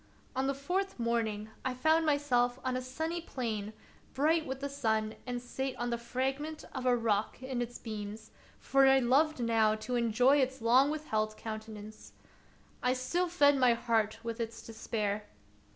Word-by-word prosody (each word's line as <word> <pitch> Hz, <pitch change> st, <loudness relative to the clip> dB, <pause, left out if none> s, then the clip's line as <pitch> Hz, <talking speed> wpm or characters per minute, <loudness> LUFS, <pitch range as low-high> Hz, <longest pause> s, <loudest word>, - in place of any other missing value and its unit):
On 265 Hz, +1 st, 0 dB
the 275 Hz, -, 0 dB
fourth 375 Hz, +8 st, -2 dB
morning 220 Hz, -2 st, -1 dB
I 260 Hz, -1 st, -2 dB
found 315 Hz, +5 st, +3 dB
myself 250 Hz, -4 st, +2 dB
on 255 Hz, -1 st, 0 dB
a 255 Hz, -, -1 dB
sandy 320 Hz, +7 st, -3 dB
plain 220 Hz, -9 st, -3 dB, 0.4 s
bright 315 Hz, +4 st, +2 dB
with 265 Hz, 0 st, -4 dB
the 280 Hz, -, -2 dB
sun, 220 Hz, -6 st, 0 dB
and 245 Hz, -1 st, -2 dB
sate 260 Hz, +2 st, -4 dB
on 240 Hz, 0 st, -2 dB
the 235 Hz, -, 0 dB
fragment 270 Hz, +6 st, -3 dB
of 255 Hz, -1 st, -3 dB
a 245 Hz, -1 st, +4 dB
rock 220 Hz, +1 st, 0 dB
in 260 Hz, -2 st, -2 dB
its 240 Hz, 0 st, -4 dB
beams, 215 Hz, -1 st, -7 dB, 0.3 s
for 270 Hz, 0 st, +4 dB
I 270 Hz, 0 st, +7 dB
loved 270 Hz, +4 st, +3 dB
now 220 Hz, -2 st, +3 dB
to 220 Hz, +3 st, -3 dB
enjoy 240 Hz, +4 st, +4 dB
its 265 Hz, -1 st, +1 dB
long 250 Hz, +5 st, +5 dB
withheld 215 Hz, -9 st, -2 dB
countenance. 215 Hz, -1 st, -8 dB, 0.7 s
I 250 Hz, -, +2 dB
still 340 Hz, +8 st, -1 dB
fed 285 Hz, -5 st, +4 dB
my 250 Hz, -2 st, +5 dB
heart 225 Hz, -2 st, 0 dB
with 230 Hz, 0 st, -4 dB
its 230 Hz, 0 st, -4 dB
despair. 215 Hz, -2 st, -3 dB
250 Hz, 170 wpm, -32 LUFS, 225-275 Hz, 0.7 s, I